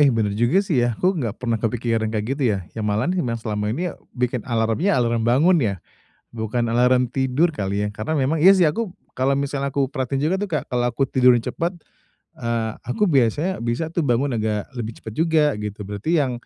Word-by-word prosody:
Eh, 145 - +6
bener 110 -5 +1
juga 120 - +2
sih 150 -10 +1
ya. 120 -2 0
Aku 185 +1 +2
enggak 115 -6 -3
pernah 115 -2 -1
kepikiran 115 -1 0
kayak 110 -1 -2
gitu 145 - -3
ya, - - -3
ya 115 - -6
malahan 105 - 0
yang 120 -10 -1
selama 105 -2 -3
ini 175 +4 -2
ya - - -13 0.2
bikin 125 0 0
alarmnya, 115 - +1
alarm 120 -2 +1
bangun 160 +9 +4
ya, 105 -5 0 0.6
bukan 115 +1 -2
alarm 125 +1 +3
tidur 135 +6 +1
kali 100 -7 -2
ya. 105 - 0
Karena 110 +9 -3
memang 145 +3 +1
iya 190 +5 +8
sih 185 - +4
aku 205 +2 -3 0.2
kalau 135 +2 +2
misalnya 140 -1 -2
aku 140 -2 +2
perhatiin 135 0 -2
juga 170 +5 +2
tuh 205 - -2
kayak 150 - -1
kalau 120 -1 +1
aku 125 +3 0
tidur 125 -1 +5
cepet, 165 +9 -2 0.7
eee, 115 -1 -1 0.2
aku 125 +12 0
biasanya 150 +4 +1
bisa 120 +7 -1
tuh 170 - 0
bangun 130 0 +1
agak 110 -2 -1
lebih 115 -2 -5
cepet 110 - -8
juga, 160 +1 +3 0.2
gitu. 105 0 -6
Berarti 105 +9 -4
yang 135 -3 +1
125 Hz, 210 wpm, -22 LUFS, 115-150 Hz, 0.7 s, iya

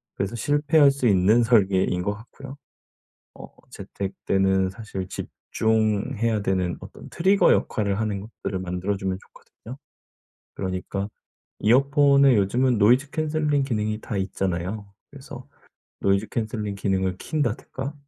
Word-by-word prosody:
그래서 100 +4 -3
실패할 145 +4 +3
수 135 -3 -1
있는 105 +4 +4
설계인 95 -6 +2
것 100 - -1
같고요. 135 +5 -12 0.8
어 - - -10 0.2
재택 100 -1 -6
때는 95 -1 +2
사실 95 -3 -7
집중해야 110 +2 -1
되는 95 -3 -1
어떤 - - -12
트리거 195 +4 +3
역할을 100 -2 0
하는 105 -3 -2
것들을 100 -2 -6
만들어주면 95 +1 -3
좋거든요. 125 +4 -14 0.8
그러니까 95 +1 -3 0.5
이어폰에 140 +2 +4
요즘은 120 +5 +2
노이즈 125 +7 +4
캔슬링 150 -2 0
기능이 110 -4 -2
다 105 - -4
있잖아요. 95 +1 -3 0.2
그래서 135 -2 -11 0.5
노이즈 100 +2 +1
캔슬링 110 -2 -3
기능을 95 -2 -1
켠다든가 135 0 -3
110 Hz, 305 characters per minute, -24 LUFS, 95-130 Hz, 0.8 s, 있는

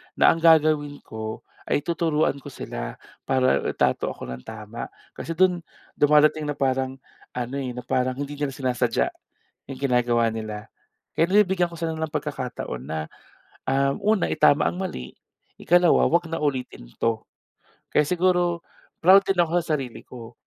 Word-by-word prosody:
na - - +6
ang 165 - -1
gagawin 155 -3 +3
ko 110 0 -6 0.2
ay 145 - +1
tuturuan 160 -4 0
ko - - -12
sila - - -6 0.3
para 130 -1 +3
itrato - - +1
ako - - -6
nang 65 - -6
tama. 110 +1 -7 0.2
Kasi 165 - -6
dun 180 0 +3 0.4
dumadating 150 +1 +4
na 145 - -2
parang 130 -1 0 0.4
ano, 125 +2 -3
eh, 125 -2 -4
na 125 - -6
parang 125 0 0
hindi 145 +1 -6
nila 135 -3 -2
sinasadya 125 -3 0 0.6
yung 130 - -6
ginagawa 120 -3 +2
nila 110 -1 -6 0.5
kaya 165 - +5
nabibigyan 190 -4 +4
ko 170 - -11
sila 160 -1 -3
ng 160 -1 -4
pagkakataon 130 - -4
na, 80 -1 -4 0.6
um, 135 +1 +1 0.2
una 195 - -1
itama 150 -1 +4
ang 175 - -8
mali, 180 - -6 0.4
ikalawa, 175 0 +4
wag 170 0 +1
na 165 - -2
ulitin 130 - -3
'to. 115 -1 -1 0.7
Kaya - - +5
siguro 175 0 +1 0.3
proud 190 +4 +7
din 195 -2 0
ako 170 -2 +2
sa 155 -2 0
sarili 120 -4 -7
ko 120 -1 -11
145 Hz, 155 wpm, -24 LUFS, 125-165 Hz, 0.7 s, proud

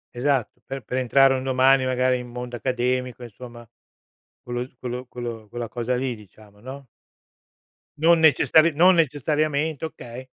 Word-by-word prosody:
Esatto, 130 -1 -1
per 135 -1 -7
per 125 - -4
entrare 135 +1 +4
un 130 - -4
domani 130 0 +3
magari 130 0 +1
in 125 0 -8
mondo 125 0 -7
accademico, 125 0 -2
insomma 120 0 -11 0.7
quello 120 0 -4
s 130 - -31
quello 125 0 -6
quello 120 -3 -7
quella 120 0 -6
cosa 120 +1 -2
lì, 130 0 -2
diciamo, 105 0 -18
no? 130 +4 -10 1.1
Non 165 +2 +4
necessari 160 +1 +4
non 180 +5 +5
necessariamente, 155 0 0
okay. 125 -5 -9
130 Hz, 145 wpm, -23 LUFS, 120-140 Hz, 1.1 s, non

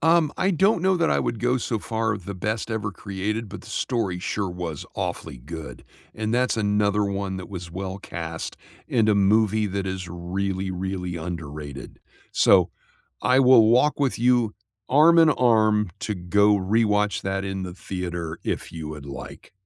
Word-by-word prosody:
Um, 160 -1 +4
I 195 - +2
don't 190 +1 +3
know 190 -1 +3
that 170 -1 +2
I - - +3
would 115 - -2
go 125 +1 +2
so 115 -3 -2
far 110 -1 -1
with 95 -3 -6
the 100 - -5
best 105 +5 -3
ever 105 -2 -2
created, 100 +3 -4
but 105 - -9
the - - -14
story 105 -8 -2
sure 100 +1 -2
was 90 -4 -5
awfully - - -4
good, 75 -1 -9 0.3
and 110 0 -2
that's 125 0 +2
another 105 -1 +2
one 100 -1 -2
that 95 - -7
was 90 -3 -7
well 95 +2 -5
cast 80 -4 -6 0.3
in 110 -3 +2
a 105 - +4
movie 105 +1 +3
that 100 0 -3
is 95 -1 -4
really, 95 +2 -3
really 90 -1 -3
underrated; 75 -4 -7 0.3
so, - - +4 0.5
I 130 +1 +4
will 125 -4 +7
walk 125 +6 +4
with 140 -4 0
you 120 -3 +3 0.3
arm 155 +5 +6
and 160 -2 +7
arm 110 -4 +3
to 105 - -2
go 100 +3 +3
rewatch 105 -1 +1
that 95 0 -2
in 95 -1 -3
the 90 -1 -7
theater 85 -3 -5
if - - -3
you 80 -2 -6
would 75 -2 -8
like, 70 -2 -9
100 Hz, 175 wpm, -24 LUFS, 90-115 Hz, 0.5 s, will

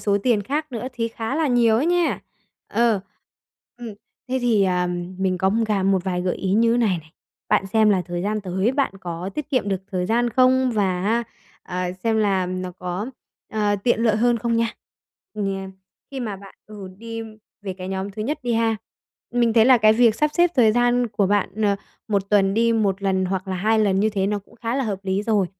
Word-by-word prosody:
số 200 -1 +1
tiền 225 -4 +2
khác 295 +5 -3
nữa 235 +1 -4
thì 230 -2 -2
khá 225 +2 -4
là 320 - +1
nhiều 235 -3 +4
á 270 - +1
nha. 350 0 +1 0.5
Ờ. 230 -4 +2 0.8
Ừm, 235 -3 -7 0.3
thế 260 +1 0
thì, 220 -5 +3
ờm, 180 -1 -1
mình 185 -1 0
có, 190 +2 +2
ưm, 225 +3 +1
cà 210 -3 0
một 190 -1 +2
vài 180 -2 -1
gợi 180 -1 -1
ý 190 -1 -2
như 230 +2 +3
này 210 -8 +2
này, 155 +1 -16 0.4
bạn 195 - +2
xem 215 +2 +3
là 190 -3 +2
thời 175 0 -3
gian 210 +2 -1
tới, 190 +4 0
bạn 275 -6 0
có 175 +2 -5
tiết 300 -1 -5
kiệm 255 -7 +1
được 190 -1 -2
thời 180 -1 -1
gian 235 +2 +1
không 255 +1 +3
và, 190 -4 0 0.6
a, 180 0 -4
ờ, 180 - -3
xem 225 -1 +2
là 195 -3 +1
nó 185 0 -4
có, 180 +4 -4 0.5
ờ, 210 -1 +1
tiện 240 -2 +2
lợi 225 -2 +3
hơn 240 +2 +3
không 230 0 0
nha. 230 -1 +1 0.6
Ừm, 210 - -2
nh 195 -1 -3 0.4
khi 270 -1 -5
mà 215 -5 -4
bạn, 195 0 -14
ừ, 205 -3 -9
đi 230 0 -6 0.4
về 195 - -4
cái 185 0 -7
nhóm 190 +1 -3
thứ 215 +2 -5
nhất 285 +7 -2
đi 240 -1 0
ha, 225 -1 +1 0.6
mình 240 -1 +2
thấy 220 -1 +5
là 255 0 +6
cái 215 -1 +5
việc 230 -1 +4
sắp 300 +5 +1
xếp 350 0 +4
thời 225 -5 +5
gian 245 +1 +2
của 205 -2 0
bạn, 205 0 +1
ờ, 200 -1 +2 0.3
1 200 -1 -1
tuần 195 -1 +3
đi 230 +1 +3
1 200 -3 0
lần 190 -1 +1
hoặc 190 +1 -3
là 185 - -2
2 220 +4 +2
lần 195 -3 +2
như 215 +1 +2
thế 195 -2 0
nó 205 +1 0
cũng 200 - -19
khá 230 +1 -3
là 270 - 0
hợp 200 -4 -2
lý 190 +1 0
rồi, 210 -3 +1
210 Hz, 225 wpm, -22 LUFS, 190-235 Hz, 0.8 s, là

